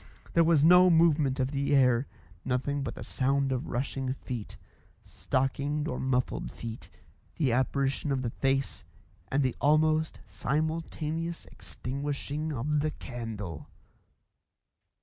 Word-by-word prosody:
There 170 - +5
was 160 -3 +4
no 180 +3 +8
movement 155 -5 +4
of 130 +1 0
the 140 0 +1
air; 125 -1 +4 0.4
nothing 130 +3 -1
but - - -4
the - - -7
sound 135 +1 0
of 130 -2 -2
rushing 130 +1 -2
feet 125 -5 -6 0.5
stockinged 140 +3 -1
or - - -3
muffled 125 -1 0
feet; 115 -1 -8 0.5
the 140 -6 +1
apparition 135 +3 0
of 130 -1 0
the 120 - -2
face; 135 +1 -1 0.5
and 140 +1 +2
the 130 -2 0
almost 155 +1 +3
simultaneous 160 +2 -2
extinguishing 145 +3 -4
of 145 +3 0
the 155 +1 +1
candle. 110 - -6
140 Hz, 125 wpm, -29 LUFS, 130-155 Hz, 0.5 s, no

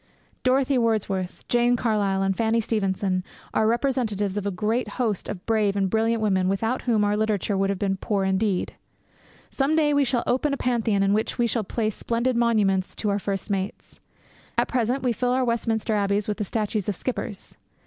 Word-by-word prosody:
Dorothy 260 +1 +2
Wordsworth, 205 -5 -1
Jane 240 0 +3
Carlyle, 205 -5 +1
and 195 0 +1
Fanny 225 +1 +1
Stevenson 195 -4 0 0.3
are 220 - +2
representatives 225 -5 0
of 205 -1 -2
a - - +2
great 215 +5 -1
host 225 -6 -1
of 185 -3 -6
brave 215 -3 +1
and 195 -2 0
brilliant 225 0 +1
women 190 -3 +2
without 225 +6 0
whom 225 -4 +2
our 205 0 +2
literature 210 -1 0
would 195 0 +1
have 200 - -1
been 195 0 -1
poor 200 0 -1
indeed. 190 0 0 0.8
Some 280 +3 +1
day 300 -2 +3
we 285 0 +4
shall 245 -2 0
open 280 +3 +1
a - - -9
Pantheon 225 -6 +1
in 195 0 +3
which 215 +1 0
we 240 - +2
shall 230 -1 0
place 215 +2 -2
splendid 235 +4 -1
monuments 210 -5 +2
to 210 - -1
our 200 - 0
first 200 +1 -3
mates. 195 0 -4 0.6
At - - +3
present 250 +2 0
we 245 -2 +2
fill 245 +2 0
our 255 0 +2
Westminster 230 -2 0
Abbeys 200 0 +1
with 210 - -2
the 210 - -2
statues 210 -1 -2
of 205 - -1
skippers. 225 -4 -4
215 Hz, 190 wpm, -25 LUFS, 200-240 Hz, 0.8 s, we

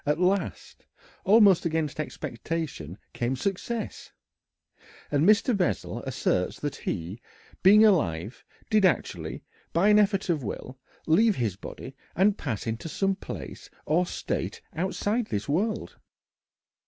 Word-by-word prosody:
At 150 +2 0
last, 185 +2 -1 0.4
almost 200 -3 +6
against 160 -3 -1
expectation, 140 - -4 0.2
came 120 +2 -1
success. 200 - -4 1.0
And 150 +6 +3
Mr. 215 +3 +4
Bessel 125 - -1
asserts - - 0
that - - -2
he, 90 +8 -4 0.4
being 210 +4 +7
alive, 110 - +1 0.3
did 215 -2 +4
actually, 180 -8 0 0.3
by 180 +5 +4
an 210 0 +6
effort 195 -2 +2
of 165 -5 +1
will, 130 +4 -6 0.3
leave 205 +7 +4
his 110 - -1
body 130 +6 -9 0.2
and 195 +3 +4
pass 120 - -4
into 115 +8 -4
some 195 +6 +1
place - - -8 0.2
or 175 +4 +2
state - - -3 0.2
outside 205 +6 -1
this 105 0 -3
world. 210 +9 -1
165 Hz, 125 wpm, -27 LUFS, 130-200 Hz, 1.0 s, being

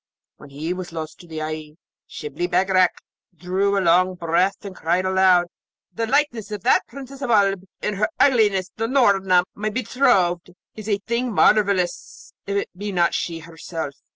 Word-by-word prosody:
When - - -14
he 155 +5 -4
was 180 -1 -7
lost 160 -1 -7
to 175 - -14
the 160 -1 -5
eye, 155 -1 -6 0.3
Shibli 355 -5 -5
Bagarag 185 - +3 0.5
drew 190 +4 0
a - - +2
long 185 +1 +3
breath 180 +4 0
and 195 -2 -7
cried 175 +3 0
aloud, 185 -1 +4 0.5
'The 225 0 -2
likeness 245 -5 0
of 210 -3 -6
that - - +3
Princess 275 0 -10
of 270 - -3
Oolb 195 -4 +2 0.2
in 210 - -1
her 205 +7 0
ugliness 210 -9 +3
to 225 +1 -1
Noorna, 195 -8 +3
my 210 +1 -3
betrothed, 205 -7 +1 0.2
is 215 0 -8
a 205 - +2
thing 235 +1 -1
marvellous, 200 -4 +1
if 200 0 -1
it 200 - -2
be 205 +2 -5
not 175 -2 +2
she 165 -1 -3
herself.' 160 -2 -6
190 Hz, 170 wpm, -22 LUFS, 175-215 Hz, 0.5 s, aloud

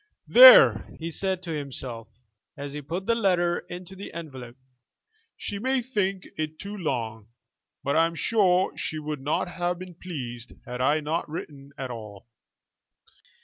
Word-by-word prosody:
"There," - - +9
he 165 +1 -5
said 190 +2 -2
to 170 - -5
himself, 130 -6 -5 0.5
as 140 0 -6
he 150 - -5
put 170 +7 -5
the 230 - +3
letter 180 -6 +2
into 180 +1 -8
the 195 - -8
envelope, 130 -7 -8 0.8
"she 200 - -5
may 260 +2 0
think 195 -6 -1
it 155 0 -3
too 200 +4 -7
long, 115 - -3 0.6
but 140 - 0
I 165 +1 +5
am 165 - -8
sure 190 -2 +2
she 155 - -4
would 150 -2 -5
not 150 +6 0
have 175 0 -2
been 185 0 -9
pleased 125 -9 -7
had 125 0 -5
I 150 +4 +2
not 155 +2 -2
written 140 -3 -8
at 130 -2 -5
all." 105 -4 -9
165 Hz, 155 wpm, -26 LUFS, 135-185 Hz, 0.8 s, There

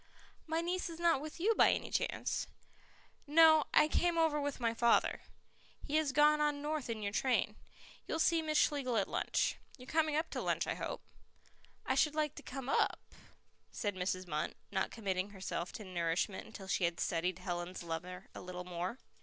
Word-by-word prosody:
"My 320 +1 0
niece 355 +1 -2
is 330 0 -8
not 335 -5 +3
with 310 +2 -7
you 425 +6 +3
by - - +5
any - - -2
chance?" - - -1 0.8
"No; 315 0 +7
I 305 - +6
came 345 +2 +1
over 315 -2 +3
with 285 -1 -3
my 230 -2 +1
father. 235 0 +3 0.6
He 300 +1 +1
has 310 -3 +1
gone 300 +2 +5
on 295 -1 +1
north 295 -3 -3
in 220 -2 -3
your 200 - -1
train. 255 +4 +1 0.5
You'll - - -1
see 325 0 +3
Miss 310 -1 0
Schlegel 265 -6 +2
at 200 - +1
lunch. - - 0 0.2
You're 250 - -12
coming 310 +1 +1
up 315 +2 -1
to - - -3
lunch, - - 0
I - - -1
hope?" - - -5 0.8
"I - - +1
should 305 -1 +2
like 305 -2 0
to - - -9
come 260 -1 -7
UP," - - +2 0.7
said 205 -2 -2
Mrs. 185 0 -2
Munt, 155 -3 -2 0.2
not 195 - 0
committing 195 -3 -2
herself 185 -3 -4
to 215 - -7
nourishment 180 +1 -1
until 210 -3 -10
she 190 - +1
had 170 0 -1
studied 175 +1 0
Helen's 175 0 -4
lover 180 +3 -5
a - - -8
little 180 0 -7
more. 180 +5 -4
250 Hz, 185 wpm, -34 LUFS, 185-310 Hz, 0.8 s, No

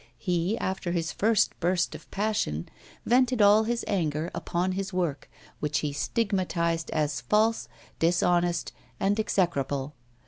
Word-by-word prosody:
He, 180 +3 0
after 185 -2 -2
his 165 -1 -1
first 220 0 +2
burst 175 0 +1
of - - -11
passion, 200 - -1 0.4
vented 250 0 +3
all 210 +1 +6
his 235 +1 -1
anger 160 -4 -1
upon 180 +2 -1
his 195 +1 -3
work, 170 -7 -2 0.3
which 150 -1 0
he 150 -2 -2
stigmatised 170 -2 -1
as 150 -5 -1
false, 215 - +2 0.3
dishonest, 175 0 +2 0.3
and 200 +2 +1
execrable. 145 -9 0
180 Hz, 130 wpm, -27 LUFS, 160-205 Hz, 0.4 s, all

